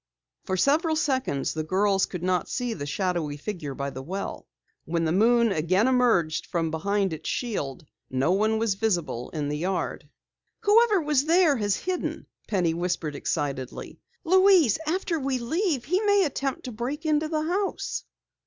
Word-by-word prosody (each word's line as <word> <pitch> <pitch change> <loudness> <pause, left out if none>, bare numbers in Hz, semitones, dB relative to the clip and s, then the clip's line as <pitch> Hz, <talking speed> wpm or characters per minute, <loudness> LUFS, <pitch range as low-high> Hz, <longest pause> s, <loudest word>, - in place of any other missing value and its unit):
For 190 -1 -1
several 315 - +2
seconds 260 - 0
the 160 - -2
girls 195 +3 +2
could 180 -2 -6
not 180 -1 0
see 245 -3 -2
the 145 -8 -6
shadowy 170 -3 -1
figure 150 -5 -5
by 140 0 -3
the 130 - -7
well. 190 +8 -5 0.4
When 165 0 -1
the 160 - +1
moon 230 +4 +4
again 185 +6 +2
emerged 230 -12 +2
from 165 -2 -1
behind 195 +3 0
its 155 - -5
shield 175 - -3 0.2
no 130 +6 +1
one 215 +3 +2
was 220 -2 +1
visible 175 - -1
in 150 -3 -3
the 150 +1 -2
yard. 185 +3 -3 0.5
"Whoever 430 -1 +5
was 295 -2 +2
there 330 -2 +4
has 205 -3 +1
hidden!" 365 - -3 0.2
Penny 180 -6 +1
whispered 170 -3 -2
excitedly. 140 -3 -4 0.2
"Louise, 370 - +5
after 340 0 0
we 270 -1 -1
leave 290 - -1
he 365 +6 +1
may 405 -2 +4
attempt 275 -2 -3
to 250 - -6
break 255 +8 -4
into 310 0 +2
the 310 -1 -1
house!" 380 +5 -2
210 Hz, 160 wpm, -26 LUFS, -, 0.5 s, Whoever